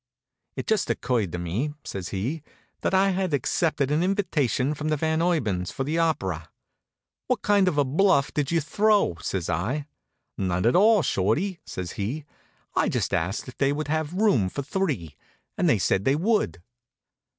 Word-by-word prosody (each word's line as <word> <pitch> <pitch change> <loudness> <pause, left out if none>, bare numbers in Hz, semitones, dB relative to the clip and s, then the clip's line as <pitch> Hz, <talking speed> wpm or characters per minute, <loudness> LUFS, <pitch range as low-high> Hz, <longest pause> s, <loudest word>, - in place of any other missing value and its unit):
"It - - -4
just 220 -3 +1
occurred 120 -8 0
to 85 - -3
me," 105 - -2
says 95 -2 -5
he, 125 +12 -3 0.4
"that - - 0
I 195 +1 +4
had 185 -4 0
accepted 145 +1 0
an 150 +2 +2
invitation 165 - +1
from 150 +1 -4
the 155 - +1
Van 160 +2 0
Urbans 110 - 0
for 135 - -3
the 155 +5 -1
opera." 95 - -1 0.8
"What - - 0
kind 200 -2 +4
of 155 - +1
a 145 - +4
bluff 150 0 +2
did 145 -2 0
you 170 -1 +2
throw?" 205 - +2
says 90 -4 -2
I. 130 +11 -1 0.5
"None 90 0 0
at 120 - +4
all, 210 0 +5
Shorty," 155 - 0
says 90 -2 -5
he. 135 +9 -3 0.5
"I - - +2
just - - -1
asked 90 +10 -1
if 130 - -11
they 140 0 +3
would 150 +1 -3
have 155 +1 -1
room 185 - +3
for 140 - -4
three, 135 - -2 0.4
and - - +2
they - - +4
said 95 - +1
they 135 +5 +3
would." 165 - 0
145 Hz, 175 wpm, -25 LUFS, -, 0.8 s, all